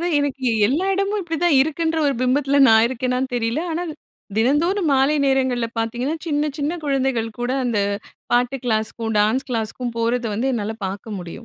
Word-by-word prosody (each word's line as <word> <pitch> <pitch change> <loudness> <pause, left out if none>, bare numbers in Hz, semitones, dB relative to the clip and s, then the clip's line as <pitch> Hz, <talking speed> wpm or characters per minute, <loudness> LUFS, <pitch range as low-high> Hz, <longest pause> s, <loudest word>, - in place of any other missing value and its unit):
அதாது 345 - -1
எனக்கு 275 -2 -2 0.2
எல்லா 300 - 0
எடமும் 395 +2 0
இப்டித்தான் 330 -3 +1
இருக்குன்ற 320 +3 0
ஒரு 280 - +1
பிம்பத்துல 275 +2 +2
நான் 225 0 +6
இருக்கேனான்னு 255 +1 -2
தெரியல. 230 +4 0
ஆனா, 330 +2 -2 0.5
தினந்தோறும் 315 - +2
மாலை 270 +3 +3
நேரங்கள்ல 260 -3 +1
பாத்தீங்கன்னா, 240 +7 -1
சின்னச் 295 -1 -1
சின்ன 305 +4 -2
குழந்தைகள் 265 -5 0
கூட 245 - -1
அந்த 235 -4 0 0.5
பாட்டு 245 +2 +2
கிளாஸ்க்கும், 225 -1 -1
டான்ஸ் 220 +6 +1
கிளாஸ்க்கும் 230 +1 -3
போறத 235 +1 0
வந்து 260 +5 0
என்னால 220 -1 -3
பாக்க 195 +3 -6
முடியும். 180 -5 -6
260 Hz, 155 wpm, -21 LUFS, 230-295 Hz, 0.5 s, நான்